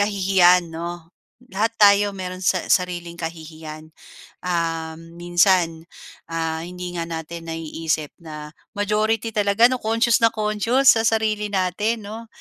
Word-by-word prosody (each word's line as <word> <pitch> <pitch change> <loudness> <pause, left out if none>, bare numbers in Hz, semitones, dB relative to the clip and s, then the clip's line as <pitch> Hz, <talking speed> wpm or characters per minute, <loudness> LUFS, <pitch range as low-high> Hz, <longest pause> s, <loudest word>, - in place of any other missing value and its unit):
kahihiyan, 185 -4 +3
'no. 170 +1 -7 0.4
Lahat 220 +4 0
tayo 205 0 +6
meron 185 -1 -6
sa 185 -1 +1
sariling 175 -2 0
kahihiyan. 160 -1 -8 0.6
Um, 165 -1 -3
minsan, 175 -2 +2 0.5
ah, 165 -1 -2
hindi 180 0 -7
nga 170 - -2
natin 165 0 -6
naiisip 160 -1 -3
na 150 -2 -9 0.2
majority 215 +2 0
talaga, 205 +2 +4
'no, 255 - -1
conscious 230 +1 +2
na 230 - +6
conscious 220 +5 +3
sa 225 - +2
sarili 215 -2 +1
natin, 205 +4 -1
'no, 225 +2 -8
180 Hz, 125 wpm, -22 LUFS, 165-210 Hz, 0.6 s, tayo